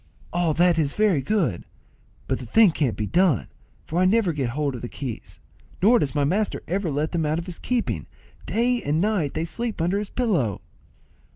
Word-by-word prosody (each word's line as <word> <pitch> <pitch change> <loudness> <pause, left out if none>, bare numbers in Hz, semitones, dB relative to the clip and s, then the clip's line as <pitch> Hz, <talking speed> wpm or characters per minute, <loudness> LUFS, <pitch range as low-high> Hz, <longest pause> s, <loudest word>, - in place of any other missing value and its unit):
"All 170 -3 +1
that 175 -1 +4
is 145 -3 0
very 205 -9 +3
good; 155 - 0 0.6
but 130 - -1
the 125 - -7
thing 210 - +5
can't 140 -7 -1
be 105 - -1
done, 165 - +2 0.4
for 165 - -2
I 185 - +4
never 195 -2 +3
get 135 -5 -1
hold 140 +2 -1
of 120 - -6
the 120 - -5
keys, 130 -5 -7 0.4
nor 230 +5 +5
does 135 -8 -1
my 145 - +2
master 200 +9 0
ever 185 0 -1
let 150 +2 -1
them 170 -2 0
out 155 +1 0
of 170 - -4
his 180 -3 -8
keeping; 245 -2 -2 0.4
day 240 +2 +1
and 150 +2 0
night 190 -7 0
they 160 - -1
sleep 230 +5 -4
under 175 +5 +1
his 210 - -5
pillow." 175 - 0
170 Hz, 200 wpm, -24 LUFS, 140-205 Hz, 0.6 s, thing